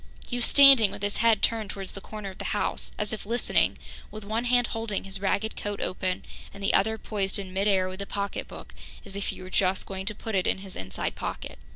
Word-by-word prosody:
He 245 - -4
was 245 - +4
standing 275 -7 +8
with 200 - -9
his 205 0 0
head 230 -2 +3
turned 220 -3 +2
towards 195 -1 -5
the 200 - -7
corner 210 -2 -7
of 185 - -16
the - - -4
house - - 0
as 210 0 -2
if 215 - -5
listening, 235 +4 +1 0.3
with 215 -1 -8
one 225 +3 -1
hand 245 0 +4
holding 225 -3 -2
his 195 0 -6
ragged 200 +2 0
coat 205 0 -4
open 185 0 -2 0.3
and 200 0 -10
the 195 - +2
other 220 +2 +3
poised 200 -3 -2
in 190 -2 -6
mid 195 +2 +1
air 190 -2 +3
with 185 +1 -7
the 200 - -5
pocketbook, 200 -1 -5 0.3
as 200 -1 -9
if 200 - -3
he - - -5
were 185 - -9
just 185 0 +2
going 190 0 -6
to 210 - -2
put 225 - -6
it 190 -2 +2
in - - +2
his 190 -1 -9
inside 95 0 -4
pocket. - - -5
200 Hz, 240 wpm, -27 LUFS, 195-220 Hz, 0.3 s, standing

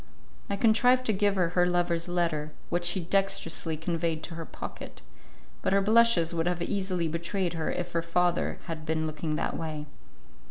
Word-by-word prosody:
I 200 - 0
contrived 245 +4 +4
to 220 - +2
give 200 0 +2
her 180 -3 +2
her 180 +1 +3
lover's 175 -1 0
letter, 165 -4 -1 0.2
which 175 0 0
she 175 +2 +2
dextrously 170 -4 0
conveyed 165 -1 -2
to 175 - -5
her 165 0 -6
pocket, - - -8 0.6
but - - +1
her 200 - +4
blushes 215 -5 +4
would 165 0 0
have 175 -1 0
easily 185 -4 -1
betrayed 170 +2 -2
her 160 -2 -2
if 175 0 -3
her 165 - 0
father 175 +1 +1
had 165 -3 -5
been 160 0 -1
looking 155 0 -3
that - - -2
way. 155 -2 -4
175 Hz, 175 wpm, -28 LUFS, 165-190 Hz, 0.6 s, contrived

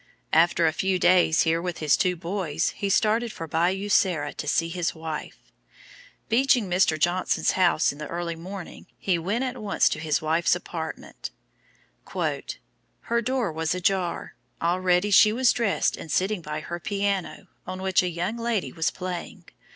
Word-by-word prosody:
After 165 +1 +4
a 160 - +2
few 190 +2 0
days 175 -2 +4
here 165 0 +2
with 175 -1 -4
his 155 -2 +3
two 185 -3 +1
boys, 175 -2 -2
he 200 - -4
started 220 +4 +2
for 165 - -7
Bayou 180 +6 0
Sara 175 -8 +2
to 150 - -6
see 165 +3 +1
his 170 -1 -2
wife. 160 -1 -6 0.9
Beaching 245 -2 +3
Mr. 180 -3 +2
Johnson's 175 +4 +1
house 180 -4 +3
in 145 - -12
the 150 - -5
early 170 +1 -4
morning, 180 +2 -9
he 180 -3 0
went 205 +9 -1
at 255 -2 -4
once 205 -2 +2
to 150 - -3
his 155 -1 0
wife's 165 +3 +2
apartment: 165 -2 -6 0.9
"Her 235 0 -4
door 245 -4 -1
was 160 +2 -1
ajar, 180 -1 -1 0.3
already 180 +3 +1
she 210 +2 +7
was 245 +2 +3
dressed 230 -5 +1
and 160 - -8
sitting 190 +4 0
by 150 -1 -5
her 175 +2 -6
piano, 200 +1 -2 0.2
on 185 0 -5
which 190 -1 +2
a 180 - -1
young 175 +6 -3
lady 230 -4 -1
was 160 -2 0
playing. 180 -1 -6
180 Hz, 165 wpm, -25 LUFS, 165-200 Hz, 0.9 s, she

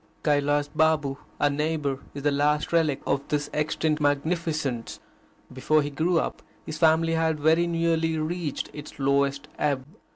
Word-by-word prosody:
Kailas 145 -1 +2
Babu, 150 -2 +1 0.2
our 145 - +3
neighbour, 150 -2 -1 0.2
is 140 - -6
the 145 - +3
last 150 +3 +1
relic 155 -5 +2
of 140 - +1
this 145 -1 -2
extinct 150 0 0
magnificence. 145 -4 -1 0.5
Before 150 +4 +2
he 145 - -4
grew 165 +5 +1
up, - - -3 0.2
his 155 0 -6
family 165 0 +4
had 160 -1 +1
very 160 +3 +3
nearly 165 -1 +1
reached 160 0 -3
its 150 0 -9
lowest 140 +1 +1
ebb. 140 -3 0
150 Hz, 150 wpm, -26 LUFS, 145-160 Hz, 0.5 s, family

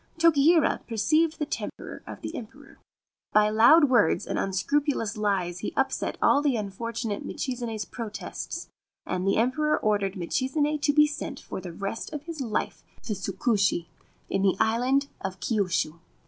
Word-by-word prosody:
Tokihira 325 -1 +4
perceived 310 +9 +2
the 300 - -1
temper 305 - -6
of - - -8
the - - -5
Emperor. 220 -3 -10 0.5
By 210 0 +5
loud 240 +10 +7
words 245 -5 +3
and - - -2
unscrupulous 225 +3 0
lies 195 -4 -1
he 205 - -5
upset 270 0 0
all 285 - +5
the 280 -5 +1
un 205 -2 -3
fortunate 230 0 -4
Michizane's 235 -5 -4
protests; 225 -4 -6 0.4
and 185 +1 -2
the 195 - +3
Emperor 300 +7 +2
ordered 205 -2 0
Michizane 270 - 0
to 290 - +3
be 300 +1 +6
sent 295 -2 -5
for - - -7
the 180 -1 -7
rest 200 - -5
of 300 -1 -5
his 325 -2 -6
life 225 -5 -2 0.2
to 215 - -2
Tsukushi, 195 -2 0 0.4
in 195 - -1
the 190 -1 +2
island 255 +5 +2 0.2
of 190 -1 -4
Kyushu. 180 -5 0
230 Hz, 155 wpm, -27 LUFS, 200-285 Hz, 0.5 s, loud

